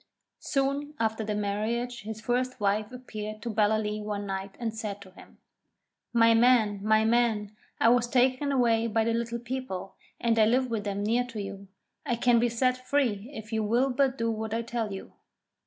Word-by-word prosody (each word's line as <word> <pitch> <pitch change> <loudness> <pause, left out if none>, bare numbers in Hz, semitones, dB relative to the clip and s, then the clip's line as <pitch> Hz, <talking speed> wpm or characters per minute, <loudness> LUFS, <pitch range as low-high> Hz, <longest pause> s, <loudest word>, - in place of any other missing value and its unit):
Soon 280 +2 -1
after 220 0 0
the 210 0 -2
marriage 220 +4 -2
his 220 +1 -7
first 250 +2 -1
wife 210 +1 0
appeared 215 -4 -7
to 235 - -2
Ballaleece 215 0 +1
one 205 -1 -3
night, 195 0 -5
and 230 -2 -2
said 210 -3 -4
to 190 -2 -13
him: 185 - -16 0.7
'My 230 -1 +5
man, 225 -3 +4
my 220 +1 +4
man, 220 -3 +1 0.2
I 230 - +5
was 240 0 +3
taken 255 +3 +2
away 230 -4 +2
by 225 0 +1
the 230 +1 +1
Little 235 0 -2
People, 240 -6 -5 0.3
and 230 -1 +2
I 215 - +6
live 250 +2 +2
with 215 -2 -2
them 200 0 -2
near 235 +4 +1
to 235 -3 -7
you. 200 0 -7 0.4
I 240 - 0
can 235 0 +4
be 240 +1 +2
set 255 +2 +1
free 245 -6 0
if 220 -4 -8
you 220 -1 +1
will 240 +6 +2
but 265 0 +1
do 230 0 0
what 220 0 -3
I 230 - -1
tell 230 -2 -3
you.' 195 - -8
225 Hz, 190 wpm, -28 LUFS, 210-245 Hz, 0.7 s, I